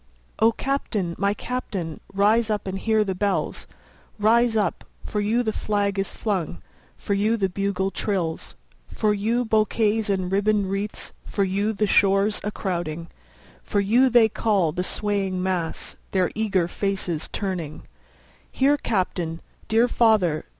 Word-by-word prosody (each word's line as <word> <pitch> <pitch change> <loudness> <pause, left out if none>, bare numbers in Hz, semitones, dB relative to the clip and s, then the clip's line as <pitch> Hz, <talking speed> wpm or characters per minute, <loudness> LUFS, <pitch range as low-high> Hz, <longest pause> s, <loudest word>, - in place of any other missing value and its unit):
O 225 +2 +5
Captain! 220 -8 -2
my 200 +1 +1
Captain! 200 -10 -4
rise 215 +3 +3
up 210 -1 -1
and 190 0 -3
hear 220 0 +2
the 195 -2 -2
bells; 200 +1 -1 0.5
Rise 225 +2 +3
up—for 210 +1 -3
you 225 +4 +1
the 220 -2 -1
flag 200 -1 -1
is 195 - -1
flung—for 150 - -4
you 215 +3 +2
the 195 -3 +1
bugle 195 0 -1
trills, 180 -7 -2 0.3
10 - - -12
For 215 -1 +2
you 225 +4 0
bouquets 220 0 +1
and 185 -2 0
ribbon'd 200 0 +1
wreaths—for 200 0 -3
you 200 +3 0
the 210 0 0
shores 200 +1 +3
crowding, 170 -3 -3 0.5
For 205 - -1
you 235 +7 +4
they 240 -2 +6
call, 200 -6 +1
the 180 +4 -2
swaying 195 -2 -1
mass, 180 -3 -2
their 185 -2 +1
eager 195 -5 +1
faces 185 -4 -2
turning; 180 -7 -4 0.7
Here, 285 +2 +3
Captain! 180 - -1 0.3
dear 225 +2 +4
father! 210 -11 +2
200 Hz, 135 wpm, -24 LUFS, 185-220 Hz, 0.7 s, they